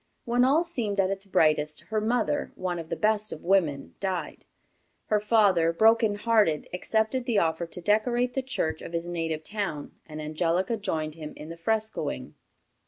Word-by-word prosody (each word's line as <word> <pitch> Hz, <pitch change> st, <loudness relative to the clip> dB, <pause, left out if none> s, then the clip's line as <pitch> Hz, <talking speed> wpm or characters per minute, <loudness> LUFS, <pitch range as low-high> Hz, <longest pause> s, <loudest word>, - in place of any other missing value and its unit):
When 240 Hz, +1 st, +2 dB
all 285 Hz, +6 st, +4 dB
seemed 220 Hz, -, -2 dB
at 190 Hz, 0 st, +3 dB
its 195 Hz, 0 st, -4 dB
brightest, 155 Hz, -4 st, +2 dB
her 215 Hz, -1 st, 0 dB
mother, 220 Hz, -9 st, 0 dB
one 180 Hz, -2 st, -3 dB
of 165 Hz, -1 st, -8 dB
the -, -, -1 dB
best 215 Hz, 0 st, +1 dB
of 155 Hz, -, -7 dB
women, 170 Hz, -7 st, +1 dB
died. 190 Hz, -3 st, -3 dB, 0.6 s
Her 210 Hz, -, +3 dB
father, 205 Hz, -6 st, +3 dB
broken 220 Hz, +3 st, +4 dB
hearted, 205 Hz, -8 st, +2 dB
accepted 220 Hz, +6 st, 0 dB
the 235 Hz, -4 st, +1 dB
offer 165 Hz, -2 st, +1 dB
to 175 Hz, -, -7 dB
decorate 240 Hz, +5 st, +1 dB
the 265 Hz, -, 0 dB
church 255 Hz, -, -2 dB
of -, -, -8 dB
his 170 Hz, 0 st, -2 dB
native 165 Hz, -2 st, -3 dB
town, 195 Hz, -7 st, -4 dB, 0.2 s
and 155 Hz, -1 st, -8 dB
Angelica 165 Hz, +7 st, 0 dB
joined 160 Hz, -7 st, -2 dB
him 155 Hz, -1 st, -8 dB
in 155 Hz, -, -9 dB
the 165 Hz, -, -6 dB
frescoing. 220 Hz, +5 st, -2 dB
195 Hz, 170 wpm, -27 LUFS, 165-220 Hz, 0.6 s, all